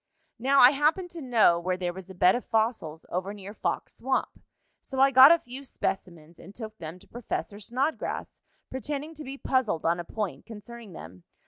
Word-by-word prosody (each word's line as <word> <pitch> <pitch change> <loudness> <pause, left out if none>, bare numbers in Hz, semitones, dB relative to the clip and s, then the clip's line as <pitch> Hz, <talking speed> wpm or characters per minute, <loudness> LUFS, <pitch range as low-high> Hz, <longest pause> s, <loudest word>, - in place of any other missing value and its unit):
"Now 270 +4 +2
I 245 - +9
happened 310 +6 +1
to 335 - -7
know 230 -10 +4
where 180 +1 -1
there 175 -1 -2
was 190 0 -10
a 190 - -10
bed 180 +1 +5
of 245 - -2
fossils 220 -9 -1
over 190 +3 -3
near 200 0 -9
Fox - - -3
Swamp. 260 +2 -2 0.4
So 265 - -5
I 270 +1 +6
got 265 +3 +9
a 335 - +7
few 260 -2 -10
specimens, 170 - -5
and 195 +3 -13
took 220 -2 -8
them 160 +1 -7
to 200 - -20
Professor 215 -3 -5
Snodgrass, 260 +8 -3 0.3
pretending 290 +4 -4
to 310 -1 -8
be 270 0 -7
puzzled 255 - 0
on 170 +1 +2
a - - -3
point 210 +1 -5
concerning 225 -1 -10
them. 90 - -11
220 Hz, 195 wpm, -27 LUFS, 180-265 Hz, 0.4 s, I